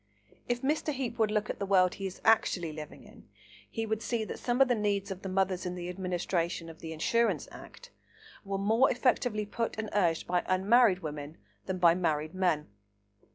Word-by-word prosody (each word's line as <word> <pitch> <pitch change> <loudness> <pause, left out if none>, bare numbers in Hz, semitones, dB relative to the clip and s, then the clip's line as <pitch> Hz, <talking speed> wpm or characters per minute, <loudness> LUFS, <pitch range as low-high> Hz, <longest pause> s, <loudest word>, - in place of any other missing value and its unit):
If 245 +1 -1
Mr. 300 +2 0
Heape 250 -4 -4
would 220 -1 +3
look 210 0 0
at - - -9
the 200 - -1
world 185 -2 +4
he 195 - -4
is 185 - -10
actually 175 -7 +3
living 150 -1 -9
in, - - -17 0.4
he 225 -1 -3
would 220 0 -2
see 235 -2 -1
that - - -6
some 245 +1 -1
of 270 - +6
the 250 - +3
needs 205 -3 -1
of 190 0 -6
the 190 - -5
mothers 190 -1 0
in 180 0 -3
the 175 0 -5
administration 175 -2 -2
of 160 - -16
the 160 - -7
Insurance 230 +9 +1
Act - - -12 0.5
were 195 -1 -3
more 220 +6 +3
effectively 245 -3 +1
put 230 +2 -3
and 220 -1 -4
urged 175 -5 +2
by 180 0 +1
unmarried 190 +1 +4
women 150 0 -6 0.3
than 190 -1 -2
by 170 -2 +6
married 155 -3 -1
men. 175 -5 +1
195 Hz, 200 wpm, -30 LUFS, 175-225 Hz, 0.5 s, of